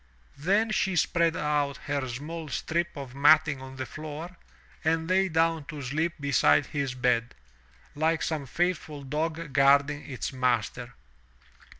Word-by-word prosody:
Then 205 +8 +2
she 190 -3 +1
spread 170 -1 +2
out 145 -3 0
her 140 -2 -1
small 155 +6 -6
strip 170 +3 -2
of 135 -3 -7
matting 145 0 +4
on 130 0 -9
the 130 0 -4
floor, 155 +5 -7 0.5
and 160 +1 +1
lay 190 +1 +2
down 165 -2 +1
to 150 0 -7
sleep 155 +6 -1
beside 120 - +3
his 140 -4 -3
bed, 125 -2 +1 0.6
like 160 +2 +1
some 150 -4 -2
faithful 160 -2 -2
dog 155 +2 -3
guarding 140 +2 +3
its 130 +1 -4
master. 125 -1 -1
150 Hz, 135 wpm, -28 LUFS, 135-165 Hz, 0.6 s, matting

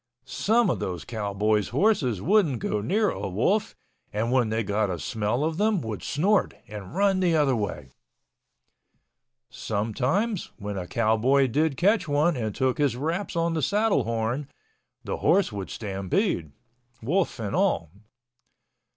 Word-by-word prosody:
Some 220 - +2
of - - -2
those 90 -3 -4
cowboys' 105 -1 0
horses 140 - +1
wouldn't 175 - +3
go 105 -1 -2
near 205 - +1
a - - -4
wolf 125 - 0 0.4
and 110 +3 -1
when 125 -4 +2
they 110 +1 0
got 105 +1 0
a 90 - -2
smell 110 - -1
of 160 +1 -1
them 210 0 +2
would 110 -3 -5
snort 195 +7 +1
and 105 - -9
run 195 -1 +3
the 175 -3 +2
other 145 -4 +3
way. 90 - -4 1.6
Sometimes 125 - -1
when 105 0 -5
a 90 -2 -4
cowboy 115 +6 +3
did 145 +3 0
catch 205 0 +2
one 150 +4 +2
and 110 -5 -3
took 130 0 0
his 140 -5 +2
wraps 165 +9 -3
on 170 0 +1
the 160 - -1
saddle 205 - +2
horn, 115 +5 -2 0.6
the - - -3
horse 195 -9 +3
would 100 -2 -5
stampede, 100 - -2 0.5
wolf 175 +9 0
and 110 +3 -3
all. 185 - +1
130 Hz, 150 wpm, -26 LUFS, -, 1.6 s, wouldn't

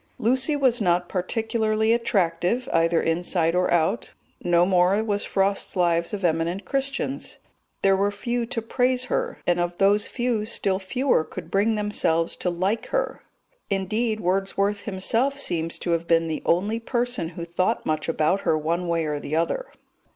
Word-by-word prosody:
Lucy 260 +6 +1
was 255 -4 +2
not 175 -2 +2
particularly 220 +3 0
attractive 195 +1 0
either 165 0 +3
inside 165 0 0
or 180 0 +1
out 165 -2 +1 0.3
no 175 0 +4
more 185 +3 +3
was 205 -2 -1
Frost's 195 +1 0
Lives 170 -2 +1
of 200 -3 -3
Eminent 170 +3 0
Christians; 275 0 -2 0.5
there 195 -1 +5
were 200 +1 +1
few 235 +3 -3
to 230 -1 -3
praise 250 +2 +1
her, - - -1
and 175 0 +2
of 175 0 -2
those 205 +1 +3
few 240 -4 -1
still 195 -3 0
fewer 250 - +1
could 170 +1 -9
bring 210 +3 +2
themselves 170 -6 0
to 180 - -1
like 190 +6 -1
her; - - -2 0.5
indeed, 215 +3 -1
Wordsworth 195 +2 0
himself 225 +8 +1
seems 165 - -1
to 175 - -3
have 170 0 0
been 165 0 +3
the 160 - -3
only 205 +7 +1
person 240 -6 -2
who 170 - -4
thought 185 +6 -1
much 155 +1 -1
about 165 +4 +1
her 155 - +2
one 170 +3 -1
way 165 -1 0
or 150 -1 -2
the 145 +1 -4
other. 170 - -1
195 Hz, 165 wpm, -24 LUFS, 170-225 Hz, 0.5 s, there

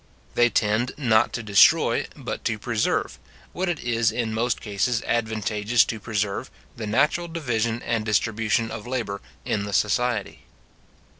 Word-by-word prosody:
They 120 0 +4
tend 110 +3 +1
not 115 -5 +3
to 120 - -3
destroy, 100 -2 +4
but - - -5
to 110 - 0
preserve, 110 0 -1 0.3
what 185 0 -1
it 170 -4 -1
is 115 -1 +1
in 115 -2 -2
most 120 +2 0
cases 115 +3 -1
advantageous 110 0 +1
to 110 - -4
preserve, 105 -2 -2 0.3
the 110 -2 -5
natural 150 +10 +2
division 120 -8 -2
and 115 -2 -1
distribution 110 +1 0
of 115 +1 -7
labour 115 -6 -3 0.2
in 100 -1 -1
the 100 - -5
society. 110 +1 0
115 Hz, 145 wpm, -24 LUFS, 105-120 Hz, 0.3 s, They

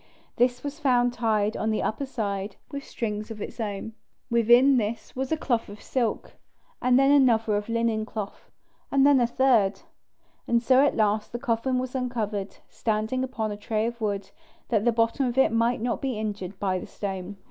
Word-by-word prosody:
This 245 0 +2
was 290 +2 -5
found 245 -4 +2
tied 220 -3 +1
on 220 - -1
the 215 - 0
upper 270 +6 -2
side 200 -5 -3 0.2
with 280 -1 -5
strings 215 -3 -4
of 225 -2 -7
its 210 - -7
own. 210 0 -4 0.4
Within 240 +4 +5
this 220 0 -3
was 265 +2 -3
a 320 - +2
cloth 240 -8 -1
of 205 +1 -10
silk, 245 -4 -2 0.4
and 250 0 +4
then 275 +1 +5
another 225 -7 +3
linen 230 -1 0
cloth, 210 -3 -7 0.4
and 275 0 +4
then 285 -2 +6
a 240 - +3
third. 230 -6 +2 0.7
And 235 - +3
so 260 +2 +5
at 285 - +2
last 215 -1 +1
the 240 - -3
coffin 245 +1 0
was 255 0 -3
uncovered, 220 -6 -3
standing 220 +3 -1
upon 225 -5 -3
a 205 - -5
tray 215 +1 -1
of 235 0 -4
wood, 200 -2 -2 0.4
that 220 -2 +1
the 240 - +5
bottom 230 +4 +1
of 240 +1 -3
it 265 - +5
might 230 +1 +1
not 240 0 -1
be 265 -5 -2
injured 205 -3 -5
by 190 -2 0
the - - -8
stone. 195 -1 -5
230 Hz, 190 wpm, -26 LUFS, 210-255 Hz, 0.7 s, then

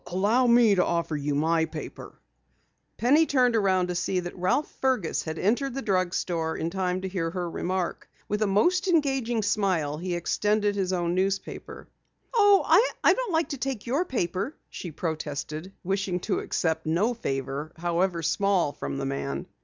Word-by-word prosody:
"Allow 210 +8 +2
me 235 -3 +6
to 180 -2 +3
offer 170 -2 -1
you 145 0 -1
my 160 +2 +2
paper." 155 -2 -8 0.8
Penny 290 +8 +4
turned 250 -4 +3
around 190 -4 +2
to - - -1
see 180 +1 0
that 175 0 -7
Ralph 185 +11 +1
Fergus 255 -11 +1
had 160 0 -5
entered 245 - 0
the 270 - -3
drugstore 180 -4 0
in 165 - -2
time 185 -1 -1
to 190 - -3
hear 180 -3 -2
her 175 +1 -3
remark. 180 +1 -3 0.2
With 210 +1 -2
a 215 - +3
most 350 - +2
engaging 270 - +1
smile, 185 -8 0
he 180 0 -2
extended 205 +4 +1
his 190 -2 -1
own 175 -2 0
newspaper. 190 +1 -3 0.5
"Oh, 410 -4 +5
I 380 +10 +4
don't - - -3
like 325 0 +1
to 280 - -4
take 260 -4 -3
your 270 +8 +1
paper," 200 - -2
she 175 - -6
protested, 155 +1 -4
wishing 190 -1 -1
to - - -1
accept 160 -1 -1
no 190 +10 +2
favor 140 - -4
however 175 +1 0
small 180 -1 +2
from - - -5
the 135 - -3
man. 140 0 -3
185 Hz, 170 wpm, -26 LUFS, 170-235 Hz, 0.8 s, me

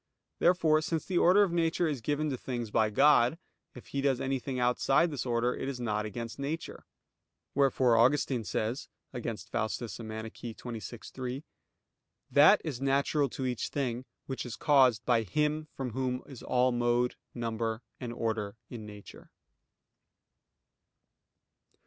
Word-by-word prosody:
Therefore 165 -3 +4
since 160 0 -2
the 180 -2 +1
order 190 +4 +6
of 195 - 0
nature 170 0 +1
is 145 -6 -2
given 150 +4 -1
to - - -1
things 120 -4 -4
by 110 0 +3
God; 135 +3 +5 0.4
if 125 - -12
He 140 - -2
does 135 -2 +2
anything 135 -1 -2
outside 135 +6 +3
this 135 -3 -4
order, 120 +1 +1
it 135 - -3
is 130 -3 -5
not 105 -3 -1
against 115 +3 -6
nature. 155 +4 -5 0.7
Wherefore 130 -3 +3
Augustine 130 0 +3
says 110 +4 -2 0.3
(Contra 115 -2 -3
Faust. 110 - -3
xxvi, 115 +1 -7
3): 130 +2 -4 0.9
"That - - +7
is 135 -5 -4
natural 140 +1 +2
to 130 - -4
each 125 -2 -1
thing 130 -3 -2 0.2
which 130 - -4
is 120 -5 -6
caused 130 -2 +4
by 120 -2 +3
Him 150 - -1
from 130 -3 -3
Whom 130 +1 -2
is 135 -4 -11
all 125 0 +2
mode, 120 0 +1 0.2
number, 115 -1 -2 0.2
and 125 -2 -5
order 110 -3 -2 0.2
in 110 -3 -7
nature." 105 -1 -12
125 Hz, 145 wpm, -30 LUFS, 115-140 Hz, 0.9 s, That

